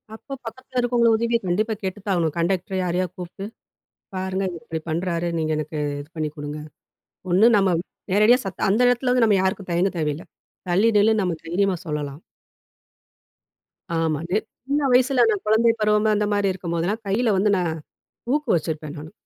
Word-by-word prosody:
அப்போ 275 - -10
பக்கத்தில 260 +2 -5
இருக்கவங்க 240 -1 +3
உதவிய 235 +1 +1
கண்டிப்பா 215 +5 +1
கேட்டு 190 +1 -3
தான் 200 0 -2
ஆவணும். 165 -3 0
கண்டெக்டர் 185 +2 0
யாரையாவது 180 0 -1
கூப்ட்டு, 185 +2 -7 0.7
"பாருங்க, 190 +1 -2
இவரு 170 -2 -9
இப்டி 160 0 -4
பண்ணுறாரு. 170 +1 -1
நீங்க 155 0 -1
எனக்கு 155 0 -4 0.2
இது 145 - -14
பண்ணி 155 -1 -2
கொடுங்க" 145 +1 -5 0.7
ஒண்ணு 190 +5 +5
நம்ம 195 -1 +3 0.4
நேரடியா 215 +5 +5
சத் 195 - -3
அந்த 210 +5 +2
எடத்துல 245 +1 +2
வந்து 250 -2 +4
நம்ம 210 -3 +4
யாருக்கும் 190 0 -2
தயங்க 175 +3 +2
தேவையில்லை. 150 0 -2 0.4
தள்ளி 195 +6 +4
நில்லுன்னு 215 +1 +4
நம்ம 180 -3 -1
தைரியமா 190 +3 +1
சொல்லலாம். 150 0 -4 1.8
ஆமாங்க. 160 +1 -1 0.4
சின்ன 285 +2 +1
வயசில 250 -1 +4
நான் 210 -3 0
குழந்தை 225 +2 +4
பருவம் 210 0 +3
அந்த 210 0 +1
மாரி 200 -1 +2
இருக்கும்போதுலாம், 175 +4 -2
கையில 215 +3 +2
வந்து 205 +2 +3
நான் 175 -3 0 0.6
ஊக்கு 300 0 -1
வச்சிருப்பேன் 155 -2 -3
நானு, 155 +3 -9
190 Hz, 160 wpm, -23 LUFS, 170-220 Hz, 1.8 s, ஒண்ணு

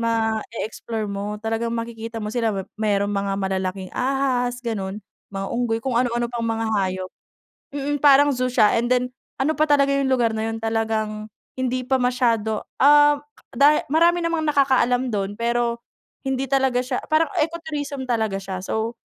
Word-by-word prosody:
ma-e-explore 225 0 -2
mo 205 +1 -4
talagang 225 +2 -2
makikita 230 0 -6
mo 210 - -4
sila. 230 -2 +1
Mep 190 - -4
merong 205 -1 +1
mga 200 0 -1
malalaking 190 -1 -3
ahas 255 -2 0
gano'n, 200 -4 -3 0.3
mga 195 0 -4
unggoy, 235 -2 0
kung 265 - -1
ano-ano 240 -1 0
pang 235 - -3
mga 225 0 -1
hayop. 185 -2 -1 0.7
Mm, 285 0 -2
parang 285 0 +6
zoo 255 0 0
siya 215 -4 +4
and 240 - -2
then 250 0 +1 0.2
ano 295 +4 +1
pa 310 0 +1
talaga 280 -1 +4
'yung 275 -1 +1
lugar 240 -3 +2
na 220 0 -2
'yun 225 - -3
talagang 220 -1 -2 0.2
hindi 255 -1 -2
pa 265 0 +1
masyado 230 -4 +1 0.2
ah, 290 +1 +6 0.3
dahi 285 +4 +4
marami 340 +1 +4
namang 330 -2 0
nakakaalam 260 -3 +2
do'n, 200 +1 -2
pero 235 0 0 0.5
hindi 265 0 -1
talaga 265 -2 +2
siya 255 0 -2
parang 315 +1 +2
eco 330 +2 0
tourism 285 -4 -5
talaga 220 -4 0
siya 190 -1 -5
so 225 +2 -2
235 Hz, 165 wpm, -22 LUFS, 220-270 Hz, 0.7 s, parang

